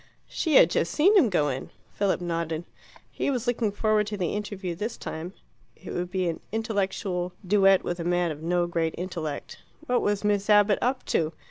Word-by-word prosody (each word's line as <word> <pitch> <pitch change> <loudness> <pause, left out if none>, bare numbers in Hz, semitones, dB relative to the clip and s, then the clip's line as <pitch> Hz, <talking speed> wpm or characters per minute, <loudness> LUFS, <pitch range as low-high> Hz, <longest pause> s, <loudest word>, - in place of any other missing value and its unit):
She 320 -4 -1
had 170 - +7
just 170 - 0
seen 385 +8 +4
him 315 - +6
go 150 -6 +2
in. 130 0 -4 0.2
Philip 200 -3 0
nodded. 165 -1 -2 0.5
He - - -2
was 250 -3 -1
looking 235 -3 0
forward 215 0 +1
to 210 0 -4
the 180 -4 -1
interview 205 -3 -4
this 210 +7 -4
time: 165 +4 -6 0.4
it - - -9
would 175 0 -3
be 185 -1 -1
an 165 - -2
intellectual 195 -4 -2
duet 195 0 +4
with 175 0 -3
a - - -2
man 175 0 +1
of 150 0 -8
no 175 +1 +1
great 165 -2 -1
intellect. 170 -4 -5 0.3
What 250 -4 +1
was 205 0 0
Miss 205 0 +1
Abbott 205 -1 +5
up 255 +1 0
to? 160 0 +1
190 Hz, 195 wpm, -26 LUFS, 170-210 Hz, 0.5 s, had